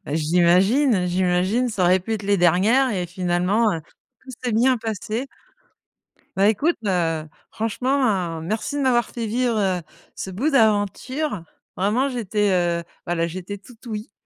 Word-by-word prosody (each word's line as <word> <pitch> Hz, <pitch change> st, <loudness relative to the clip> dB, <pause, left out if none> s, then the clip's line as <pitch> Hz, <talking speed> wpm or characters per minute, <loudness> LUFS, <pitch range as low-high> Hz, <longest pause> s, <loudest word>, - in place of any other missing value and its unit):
Bah 145 Hz, -, -4 dB
j'imagine, 180 Hz, -, +3 dB
j'imagine, 185 Hz, +7 st, +1 dB
ça 200 Hz, -5 st, 0 dB
aurait 185 Hz, +2 st, +4 dB
pu 225 Hz, +5 st, -5 dB
être 210 Hz, -, -5 dB
les 200 Hz, 0 st, +2 dB
dernières 195 Hz, +10 st, +3 dB
et 180 Hz, -4 st, -2 dB
finalement, 180 Hz, +5 st, +1 dB
heu, 165 Hz, -, -3 dB, 0.4 s
tout 260 Hz, -, -12 dB
s'est 245 Hz, -3 st, -1 dB
bien 250 Hz, +3 st, +3 dB
passé. 225 Hz, +3 st, -4 dB, 1.1 s
Bah 195 Hz, +2 st, +4 dB
écoute, 300 Hz, -, +1 dB
heu, 165 Hz, -4 st, 0 dB, 0.2 s
franchement, 225 Hz, +3 st, -3 dB, 0.2 s
hein, 175 Hz, -6 st, -1 dB
merci 220 Hz, -, -3 dB
de 285 Hz, -, -1 dB
m'avoir 240 Hz, -2 st, +2 dB
fait 230 Hz, -2 st, -5 dB
vivre, 240 Hz, +1 st, 0 dB
heu, 190 Hz, -3 st, +1 dB, 0.3 s
ce 190 Hz, -, -6 dB
bout 245 Hz, +12 st, -1 dB
d'aventure. 220 Hz, -, +1 dB, 0.3 s
Vraiment, 215 Hz, +9 st, +1 dB
j'étais, 210 Hz, -5 st, -1 dB
heu, 170 Hz, -1 st, +1 dB, 0.2 s
bah, 175 Hz, -, -1 dB
là 165 Hz, 0 st, 0 dB
j'étais 185 Hz, +4 st, -6 dB
toute 225 Hz, +4 st, -18 dB
ouïe, 215 Hz, -2 st, -5 dB
205 Hz, 160 wpm, -22 LUFS, 180-235 Hz, 1.1 s, aurait